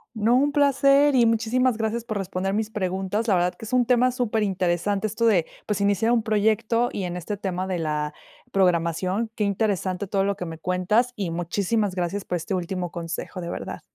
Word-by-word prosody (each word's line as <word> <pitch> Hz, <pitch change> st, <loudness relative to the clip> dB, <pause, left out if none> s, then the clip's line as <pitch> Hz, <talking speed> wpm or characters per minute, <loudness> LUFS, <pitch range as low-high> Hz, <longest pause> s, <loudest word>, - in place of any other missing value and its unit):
No, 225 Hz, +3 st, +3 dB
un 285 Hz, +3 st, +3 dB
placer, 280 Hz, 0 st, +4 dB
y 240 Hz, -, +5 dB
muchísimas 230 Hz, +2 st, +1 dB
gracias 225 Hz, +1 st, -2 dB
por 215 Hz, -3 st, -4 dB
responder 195 Hz, 0 st, -2 dB
mis 220 Hz, +1 st, -1 dB
preguntas. 195 Hz, +3 st, -2 dB
La 195 Hz, -, +4 dB
verdad 175 Hz, 0 st, +1 dB
que 225 Hz, -, -11 dB
es 235 Hz, -, -8 dB
un 250 Hz, -1 st, +4 dB
tema 250 Hz, +1 st, +3 dB
superinteresante, 205 Hz, -5 st, 0 dB
esto 220 Hz, +2 st, -1 dB
de, 180 Hz, -7 st, +3 dB, 0.2 s
pues, 205 Hz, -2 st, -1 dB
iniciar 205 Hz, +3 st, +2 dB
un 230 Hz, -2 st, +2 dB
proyecto, 220 Hz, +2 st, +1 dB
y 195 Hz, -, -4 dB
en 175 Hz, 0 st, -3 dB
este 195 Hz, +4 st, -4 dB
tema 190 Hz, -1 st, -3 dB
de 185 Hz, -2 st, -1 dB
la 150 Hz, -1 st, -2 dB, 0.4 s
programación. 185 Hz, +3 st, +1 dB
Qué 210 Hz, -, -1 dB
interesante 200 Hz, -2 st, -1 dB
todo 195 Hz, 0 st, +1 dB
lo 200 Hz, 0 st, 0 dB
que 180 Hz, -, -5 dB
me 165 Hz, -1 st, -7 dB
cuentas, 185 Hz, +9 st, +1 dB
y 195 Hz, -5 st, -3 dB
muchísimas 185 Hz, +4 st, -1 dB
gracias 180 Hz, +2 st, -2 dB
por 180 Hz, -, -1 dB
este 185 Hz, +4 st, -3 dB
último 180 Hz, -1 st, -3 dB
consejo, 170 Hz, +2 st, -5 dB
de 170 Hz, -1 st, -5 dB
verdad. -, -, -6 dB
200 Hz, 200 wpm, -24 LUFS, 180-225 Hz, 0.4 s, y